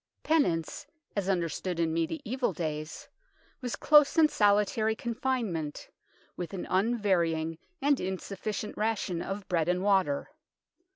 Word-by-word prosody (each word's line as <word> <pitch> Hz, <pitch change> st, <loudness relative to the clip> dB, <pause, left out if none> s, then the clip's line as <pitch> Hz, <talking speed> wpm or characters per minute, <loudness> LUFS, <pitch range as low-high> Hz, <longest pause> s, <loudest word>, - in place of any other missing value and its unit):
Penance, 280 Hz, -, +1 dB, 0.3 s
as 200 Hz, -2 st, -1 dB
understood 175 Hz, -1 st, -1 dB
in 165 Hz, -1 st, +1 dB
mediaeval 245 Hz, -, -1 dB
days, 155 Hz, -2 st, -4 dB, 0.5 s
was 245 Hz, -2 st, -3 dB
close 300 Hz, 0 st, +5 dB
and 310 Hz, -2 st, +6 dB
solitary 210 Hz, +1 st, +3 dB
confinement 230 Hz, -, -2 dB, 0.5 s
with 180 Hz, +2 st, -5 dB
an 180 Hz, -, -4 dB
un 220 Hz, +6 st, +1 dB
varying 165 Hz, -6 st, 0 dB, 0.2 s
and 285 Hz, -1 st, +3 dB
insufficient 195 Hz, +3 st, -4 dB
ration 210 Hz, -5 st, -1 dB
of 195 Hz, +1 st, -5 dB
bread 170 Hz, -2 st, +1 dB
and 180 Hz, +1 st, +1 dB
water. 190 Hz, -8 st, +2 dB
195 Hz, 120 wpm, -29 LUFS, 170-225 Hz, 0.5 s, and